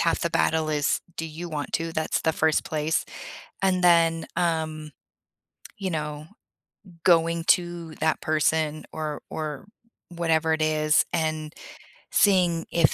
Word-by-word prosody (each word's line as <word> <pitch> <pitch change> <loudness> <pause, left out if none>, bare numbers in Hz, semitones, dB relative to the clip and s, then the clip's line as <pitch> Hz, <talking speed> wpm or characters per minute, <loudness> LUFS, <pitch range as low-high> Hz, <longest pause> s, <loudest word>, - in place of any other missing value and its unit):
half - - +1
the - - -1
battle 155 - +1
is, 150 -1 +1 0.2
do 165 - -3
you 165 +2 -7
want 150 -2 -4
to? 165 0 -1
That's 160 0 -1
the 160 - +1
first 160 0 +1
place. 155 +1 -1 0.6
And 185 -1 +2
then, 165 -2 +4
um, 160 -3 -1 0.9
you 195 -2 -3
know, 150 -2 -4 0.8
going 165 -1 +3
to 175 -2 +1
that 160 0 0
person 155 0 +1
or 155 -2 -4
or 155 -1 -5 0.4
whatever 165 -2 +1
it 160 - -1
is, 155 0 +3
and 155 -2 -1 0.6
seeing 180 -5 +3
if 165 -4 +3
160 Hz, 135 wpm, -25 LUFS, 155-170 Hz, 0.9 s, then